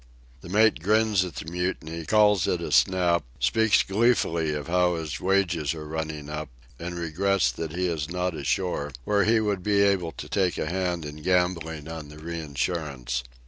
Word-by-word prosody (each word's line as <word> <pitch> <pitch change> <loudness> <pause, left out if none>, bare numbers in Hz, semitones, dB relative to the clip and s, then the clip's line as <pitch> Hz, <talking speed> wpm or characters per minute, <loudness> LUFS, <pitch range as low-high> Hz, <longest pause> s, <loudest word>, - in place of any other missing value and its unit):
The - - -10
mate 105 -2 +3
grins 105 +1 +3
at 90 -4 -7
the 80 - -6
mutiny, 85 -2 -3
calls 105 -3 +4
it 90 - +1
a 85 - -5
snap, 85 +6 +3 0.2
speaks 100 - +3
gleefully 95 -7 +1
of 75 -1 -3
how 90 +1 +2
his 80 -2 -4
wages 85 -6 +1
are 75 -1 -7
running 80 -1 -4
up, 75 +1 -5 0.3
and 85 +1 -5
regrets 85 -1 +1
that 75 +5 -5
he 90 +1 -1
is 80 -3 -2
not 90 0 -1
ashore, 75 -1 -2
where 100 -1 +2
he 110 +1 +4
would 105 -3 -1
be 100 +1 +3
able 95 -4 +2
to - - -8
take 95 -3 0
a - - -1
hand 90 -1 -2
in 75 0 -7
gambling 85 -2 0
on 80 -2 -7
the 75 - -12
reinsurance. 75 -5 -3
85 Hz, 180 wpm, -26 LUFS, 75-95 Hz, 0.3 s, calls